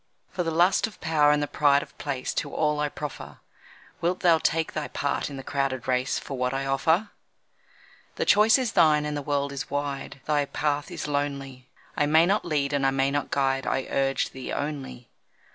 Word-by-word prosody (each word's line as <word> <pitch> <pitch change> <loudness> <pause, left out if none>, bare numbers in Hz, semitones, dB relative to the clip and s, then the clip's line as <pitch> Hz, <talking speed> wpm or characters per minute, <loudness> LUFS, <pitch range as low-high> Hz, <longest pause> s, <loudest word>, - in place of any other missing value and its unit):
For 180 - -2
the 165 - -1
lust 175 +6 +3
of 220 - -14
power 155 -2 +3
and 150 0 +3
the - - -2
pride 145 -1 +3
of - - -16
place 135 -3 -3
To - - -3
all 150 -1 0
I 150 0 0
proffer. 150 0 -7 0.6
Wilt 180 +2 0
thou 170 -3 +5
take 160 +1 0
thy 150 -1 -3
part 140 +1 -2
in 140 - -7
the 135 - -7
crowded 135 -3 -2
race 130 +2 +1
For 135 - -6
what 125 +1 -1
I 135 0 -2
offer? 160 +9 +1 1.0
The - - -1
choice 215 +3 +6
is 255 -5 -1
thine, 155 -5 +4
and 150 0 -3
the 145 - -2
world 140 0 -1
is 140 -2 -5
wide 140 -1 -4
Thy 145 -1 +1
path 145 0 -2
is - - -5
lonely. 140 -3 -3 0.3
I 145 - +1
may 160 +2 +5
not 200 +4 +1
lead 145 -4 -1
and 140 -1 +1
I 135 - +4
may 135 0 +1
not 145 0 -2
guide 135 -1 0
I 135 - 0
urge 135 -1 0
thee 130 -1 -7
only. 140 -4 -5
145 Hz, 205 wpm, -26 LUFS, 135-155 Hz, 1.0 s, choice